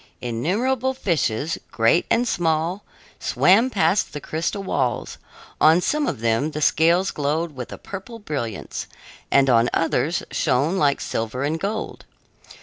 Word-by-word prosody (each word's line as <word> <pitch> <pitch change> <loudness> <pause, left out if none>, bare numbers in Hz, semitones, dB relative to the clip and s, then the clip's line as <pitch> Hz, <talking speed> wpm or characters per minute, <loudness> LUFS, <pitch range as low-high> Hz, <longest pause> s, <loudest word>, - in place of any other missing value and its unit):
Innumerable 225 - -1
fishes, 160 - -1
great 115 +9 +2
and 245 +1 +2
small, 170 0 0 0.4
swam 225 +8 +4
past 200 -3 +1
the 150 - -4
crystal 165 +7 -3
walls; - - -2 0.4
on 160 +3 +6
some 295 +9 0
of 120 - -3
them 115 +6 +1
the 155 0 -5
scales 170 +6 +3
glowed 150 +2 -2
with 125 -2 -7
a - - -7
purple 200 +4 -8
brilliance, 140 - -5 0.4
and 135 0 +4
on 120 -2 +4
others 165 +1 0
shone 145 +6 +1
like 140 -2 +2
silver 115 +4 -3
and 155 +3 -1
gold. 210 +4 -4
160 Hz, 140 wpm, -22 LUFS, 140-195 Hz, 0.4 s, on